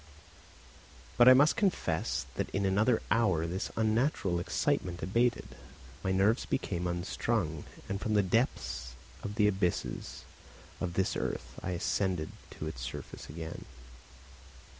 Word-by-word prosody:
But 120 +1 +8
I 130 - +10
must 145 +4 +5
confess 180 - 0
that - - -2
in 100 +1 -1
another 110 +5 +3
hour 95 -8 +3
this 90 +5 -3
unnatural 110 - +1
excitement 85 0 -1
abated, 115 +7 +1 0.5
my 95 - +1
nerves 100 +5 +2
became 90 -9 -1
unstrung, 85 -1 -1 0.2
and 100 +1 -3
from 110 -1 0
the 105 - +5
depths 65 - -1 0.3
of 105 - -5
the 105 -2 +4
abysses 95 -3 -1 0.6
of 85 -2 -3
this 95 +1 +1
earth - - -3
I 90 - -2
ascended 90 -2 0 0.3
to - - -4
its - - -5
surface 65 - -7
again. 80 0 -7
95 Hz, 130 wpm, -31 LUFS, 85-110 Hz, 0.6 s, I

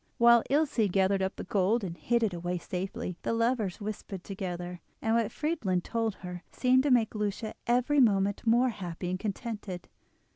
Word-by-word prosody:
While 235 0 +7
Ilse 275 -7 +2
gathered 195 +1 +2
up 190 +1 -1
the - - -6
gold 205 +3 +1
and 175 -3 -4
hid 235 +5 +1
it 210 -4 +1
away 175 +1 -2
safely, 180 0 -4
the - - -1
lovers 230 -4 0
whispered 205 -3 -6
together, 180 -2 -5 0.2
and 225 - 0
what 230 -2 +2
Friedlin 260 - -1
told 225 -2 -1
her 180 -1 -7
seemed 255 0 +3
to 285 - +1
make 235 -4 +3
Lucia 210 +1 -2
every 250 +4 +3
moment 205 -4 +3
more 240 +3 +5
happy 180 -4 -5
and 185 - -2
contented. 210 -3 -5
210 Hz, 175 wpm, -29 LUFS, 185-235 Hz, 0.2 s, While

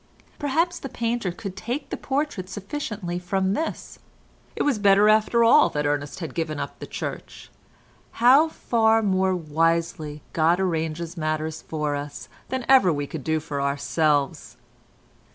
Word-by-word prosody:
Perhaps 330 +5 0
the 270 - -6
painter 230 -5 -2
could 190 +2 -7
take 245 +8 -5
the - - -1
portrait 265 -9 -3
sufficiently 200 - -4
from 190 +1 0
this. 320 +8 -4 0.6
It - - 0
was 275 -7 +1
better 200 +1 +5
after 220 +2 +4
all 240 +6 +6
that 150 0 -2
Ernest 145 +3 -2
had 160 -6 -5
given 155 -1 -3
up - - -6
the - - -7
Church—how 265 +7 -1
far 225 -6 +2
more 190 -2 +2
wisely 165 -1 -1
God 165 +2 +3
arranges 165 -1 -2
matters 155 0 -2
for 150 -2 -2
us 145 0 -7 0.2
than 260 -2 -3
ever 260 -9 +6
we 145 -2 -2
can 150 +1 -6
do 160 +3 0
for 150 -3 -4
ourselves! 145 +1 0
180 Hz, 145 wpm, -24 LUFS, 155-230 Hz, 0.6 s, all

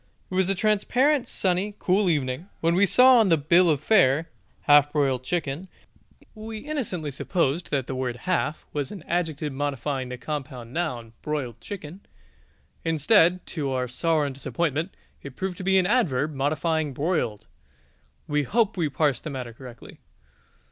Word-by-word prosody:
It - - -6
was 190 0 +2
a 195 - +2
transparent, 245 +8 +2
sunny, 190 +2 0
cool 190 +1 +2
evening, 130 -5 0
and 180 +5 -17
when 165 +1 +2
we 195 +3 +4
saw 255 +5 +7
on 215 -4 +3
the 165 - +5
bill 170 +4 +4
of 150 -2 +1
fare 165 -5 +3 0.3
half 145 0 +5
broiled 135 -4 +1
chicken, 160 +2 -3 0.7
we 220 0 -7
innocently 215 - -4
supposed 165 +2 -1
that 135 -4 -1
the 130 - -5
word 130 -2 -2
half 165 -4 -1
was 145 -3 -2
an 195 -6 -8
adjective 160 -5 -2
modifying 135 -1 -3
the 125 - -6
compound 130 -3 -6
noun, 125 -10 -3
broiled 130 -7 -4
chicken. 185 -2 -8 0.8
Instead, 165 +3 +3
to 145 -5 -3
our 130 -1 -1
sorrow 155 +4 0
and 140 - -3
disappointment, 160 +5 -2 0.3
it 140 -2 -10
proved 190 -2 -4
to - - -6
be 190 +1 +3
an 185 - +3
adverb 155 - +1
modifying 150 +2 -1
broiled 130 - -1 0.8
(we 150 0 +1
hope 220 - +1
we 165 -4 0
parse 140 -1 +1
the - - -7
matter 125 -4 -6
correctly). 120 0 -12
155 Hz, 160 wpm, -25 LUFS, 135-185 Hz, 0.8 s, saw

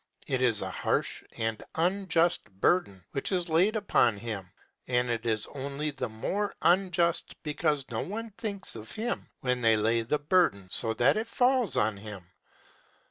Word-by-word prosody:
It 130 -1 -1
is 115 -6 +2
a 95 - -4
harsh - - -1
and 110 -1 -2
unjust 175 -1 +1
burden 100 - +1
which 135 - -3
is 180 -2 -1
laid 180 +7 +3
upon 125 - +2
him, 100 -4 -6 0.4
and 125 -1 +1
it 115 0 -3
is 110 -2 0
only 140 +2 -3
the 130 -3 -4
more 195 - -3
unjust 175 -1 +2
because 150 -2 0
no 110 - -2
one 225 +3 -5
thinks 200 -1 -3
of 110 -1 -9
him 230 +2 -4
when 125 -1 0
laying 115 0 +2
the 150 +6 +1
burden 145 - +2
so 110 -1 +7
that 130 - +3
it 220 +1 -2
falls 250 -3 +2
on 105 -1 +1
him. 100 -3 -9
140 Hz, 160 wpm, -28 LUFS, 110-185 Hz, 0.4 s, so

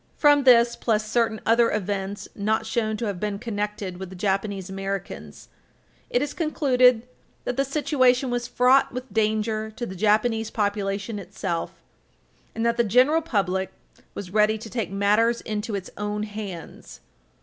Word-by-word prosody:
From 290 -2 +5
this, 235 -2 +6
plus 215 -2 0
certain 225 -1 +1
other 230 +1 +4
events 200 -1 -3
not 220 +2 0
shown 220 -1 -1
to 230 - -3
have 200 -4 -3
been 210 0 -2
connected 210 -4 -4
with 190 0 -7
the 190 - -10
Japanese 195 0 -1
Americans, 195 0 -6 0.6
it 245 - +1
is 290 - -4
concluded 255 -7 +3 0.4
that 245 - -2
the 275 - +2
"situation 265 -3 +2
was 240 0 -2
fraught 250 +2 +4
with 250 -3 -7
danger 220 0 0
to 240 - -4
the 190 - -7
Japanese 220 +3 +1
population 205 0 -2
itself," 185 -2 -5 0.7
and 225 +1 -1
that 235 0 +1
the 235 - +4
general 255 +9 +4
public 190 - -1 0.4
"was 185 -3 -7
ready 215 0 +3
to 220 0 -10
take 230 -3 -2
matters 210 +4 +2
into 215 0 -3
its 190 -2 -6
own 210 0 -3
hands." 205 -5 -8
215 Hz, 155 wpm, -24 LUFS, 200-240 Hz, 0.7 s, this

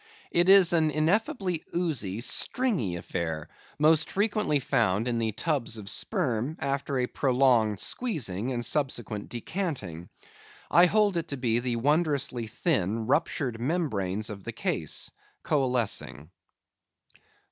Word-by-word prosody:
It 175 +2 +3
is 190 -3 +7
an 160 -2 +3
ineffably 180 - 0
oozy, 130 - -2
stringy 170 - +1
affair, 80 -2 -4 0.3
most 155 +1 +4
frequently 205 -7 +1
found 110 -3 +1
in 120 -1 0
the 110 -1 0
tubs 120 -1 -1
of 105 -2 -9
sperm, 145 - -1
after 140 0 -2
a 125 - +1
prolonged 125 -6 +2
squeezing, 130 - -2
and 120 -2 -2
subsequent 120 -7 -1
decanting. 120 - -5 0.6
I 175 +1 +7
hold 205 -1 +2
it 170 0 -2
to 140 - -4
be 120 -2 +1
the 120 -1 -2
wondrously 140 -3 0
thin, 110 - -1
ruptured 125 -1 0
membranes 110 - -1
of 100 -2 -9
the - - -6
case, - - -1 0.3
coalescing. 120 - -1
130 Hz, 125 wpm, -27 LUFS, 110-165 Hz, 0.6 s, is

